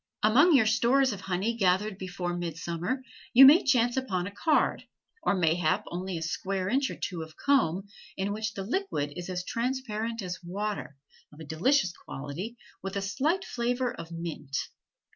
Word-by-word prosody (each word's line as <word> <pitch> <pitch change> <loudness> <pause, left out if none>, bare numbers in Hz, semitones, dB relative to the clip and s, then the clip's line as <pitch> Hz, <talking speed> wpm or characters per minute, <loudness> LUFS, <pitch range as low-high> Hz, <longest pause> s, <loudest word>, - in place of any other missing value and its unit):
Among 290 +10 +6
your 245 -5 +5
stores 245 +4 +3
of 200 - -7
honey 195 +5 -1
gathered 195 0 +1
before 180 -1 -3
midsummer, 170 - -3 0.3
you 265 +2 +10
may 295 +6 +8
chance 245 -3 +3
upon 195 -9 -1
a 200 - -5
card, 205 +10 +1 0.4
or - - +2
mayhap 175 +2 +2
only 180 0 -3
a 165 - -4
square 185 +3 -2
inch 265 +3 +1
or - - -5
two 175 -4 -4
of 160 -1 -9
comb, 205 - +2 0.3
in 195 +1 -1
which 215 0 -3
the 195 - -4
liquid 210 - -2
is 175 +1 -6
as 180 -1 -3
transparent 230 -3 -2
as 180 0 -5
water, 200 -4 -4 0.3
of 150 - -16
a - - -7
delicious 180 - +2
quality, 165 - -7 0.2
with 195 0 -5
a 200 - -1
slight 300 - 0
flavor 245 +1 -1
of 165 - -9
mint. 165 -5 -5
195 Hz, 170 wpm, -28 LUFS, 175-245 Hz, 0.4 s, you